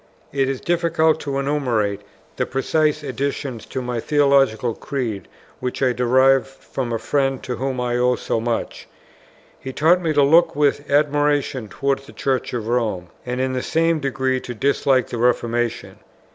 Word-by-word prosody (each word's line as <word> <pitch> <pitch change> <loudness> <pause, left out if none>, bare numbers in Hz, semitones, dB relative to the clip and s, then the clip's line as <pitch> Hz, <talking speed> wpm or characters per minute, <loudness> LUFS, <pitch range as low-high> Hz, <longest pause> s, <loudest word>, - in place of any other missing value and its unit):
It 135 -1 +1
is 135 -2 -2
difficult 165 -2 +1
to 140 -2 -3
enumerate 125 -8 0 0.3
the - - -1
precise 150 +3 0
additions 135 -3 -4
to 130 - -4
my 125 -1 -2
theological 135 -5 +2
creed 120 -7 -4 0.3
which 125 +1 -3
I 125 -1 +3
derived 130 +2 +3
from 135 -2 -6
a 115 - 0
friend 135 +2 -1
to 125 - -4
whom 130 -1 -2
I 120 0 0
owe 125 0 +3
so 115 - -2
much. 115 0 -3 0.7
He 130 - -6
taught 165 +6 +3
me 165 -2 0
to 145 -1 +4
look 160 +4 +4
with 145 0 +1
admiration 145 -3 +1
towards 140 +2 -2
the - - -13
Church 130 -2 -1
of 115 -3 -4
Rome, 110 -7 -1 0.2
and 125 +1 -2
in 130 0 0
the 130 - -1
same 165 +1 +1
degree 130 -2 -1
to 125 -1 -7
dislike 135 +1 +1
the 120 - -4
Reformation. 120 -1 0
135 Hz, 165 wpm, -21 LUFS, 125-145 Hz, 0.7 s, to